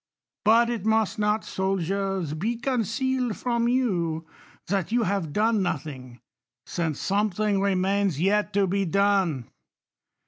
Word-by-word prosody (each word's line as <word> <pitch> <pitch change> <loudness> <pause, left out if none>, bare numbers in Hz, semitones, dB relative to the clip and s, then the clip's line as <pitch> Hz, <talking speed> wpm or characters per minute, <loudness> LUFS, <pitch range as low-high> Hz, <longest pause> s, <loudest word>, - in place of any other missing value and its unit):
But 230 +2 +5
it, 230 -5 -3
must 220 0 +1
not, 210 +1 +1
soldiers, 190 -2 -1
be 210 +10 -1
concealed 250 0 -1
from 235 -1 0
you, 175 -11 0 0.4
that 195 -2 -1
youi| 235 +1 +1
have 185 -5 -1
done 220 +5 +2
vothlns: 135 -8 -4 0.5
since 160 -4 -2
.something 205 0 0
remains 195 -3 +1
yet 205 +3 +2
to 200 0 +3
be^ 195 -1 0
done. 190 - +1
200 Hz, 125 wpm, -25 LUFS, 175-220 Hz, 0.5 s, But